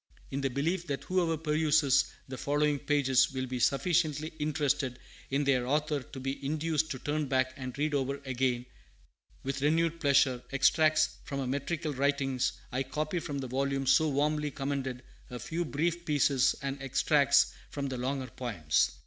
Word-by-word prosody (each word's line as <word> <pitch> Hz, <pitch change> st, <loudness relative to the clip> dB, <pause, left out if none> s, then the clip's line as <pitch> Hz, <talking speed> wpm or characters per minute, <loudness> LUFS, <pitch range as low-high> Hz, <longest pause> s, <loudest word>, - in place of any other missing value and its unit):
In 140 Hz, -, -2 dB
the 135 Hz, -, 0 dB
belief 165 Hz, +7 st, -1 dB
that 140 Hz, -2 st, -3 dB
whoever 175 Hz, -3 st, +1 dB
peruses 150 Hz, -3 st, +3 dB, 0.2 s
the 130 Hz, -, -6 dB
following 145 Hz, +2 st, +1 dB
pages 135 Hz, -3 st, +3 dB
will 130 Hz, 0 st, -2 dB
be 125 Hz, -1 st, -4 dB
sufficiently 155 Hz, +2 st, +1 dB
interested 145 Hz, -4 st, 0 dB, 0.3 s
in 140 Hz, +2 st, +1 dB
their 130 Hz, -3 st, +2 dB
author 150 Hz, +1 st, 0 dB
to 130 Hz, +2 st, -10 dB
be 135 Hz, +2 st, -4 dB
induced 155 Hz, +2 st, 0 dB
to 130 Hz, -, -3 dB
turn 150 Hz, +2 st, -2 dB
back 130 Hz, -1 st, +1 dB
and 130 Hz, -1 st, -7 dB
read 150 Hz, +1 st, 0 dB
over 140 Hz, 0 st, -1 dB
again, 125 Hz, -1 st, 0 dB, 0.8 s
with 135 Hz, 0 st, -3 dB
renewed 165 Hz, +3 st, +2 dB
pleasure, 135 Hz, -4 st, +3 dB
extracts 155 Hz, +3 st, +3 dB
from 140 Hz, -, -4 dB
her 135 Hz, -, -2 dB
metrical 150 Hz, +4 st, -2 dB
writings, 135 Hz, -1 st, 0 dB, 0.2 s
I 125 Hz, +2 st, -1 dB
copy 150 Hz, +6 st, -2 dB
from 145 Hz, -3 st, -5 dB
the 135 Hz, -1 st, -4 dB
volume 135 Hz, +2 st, -1 dB
so 155 Hz, +4 st, +4 dB
warmly 150 Hz, +1 st, 0 dB
commended 135 Hz, -2 st, -3 dB, 0.3 s
a 125 Hz, -, -6 dB
few 165 Hz, +7 st, -3 dB
brief 170 Hz, +3 st, -1 dB
pieces 140 Hz, -4 st, +3 dB
and 140 Hz, 0 st, -3 dB
extracts 140 Hz, +1 st, +3 dB, 0.2 s
from 140 Hz, -1 st, -4 dB
the 130 Hz, -, -4 dB
longer 130 Hz, +1 st, -2 dB
poems. 85 Hz, -12 st, 0 dB
140 Hz, 165 wpm, -30 LUFS, 130-150 Hz, 0.8 s, so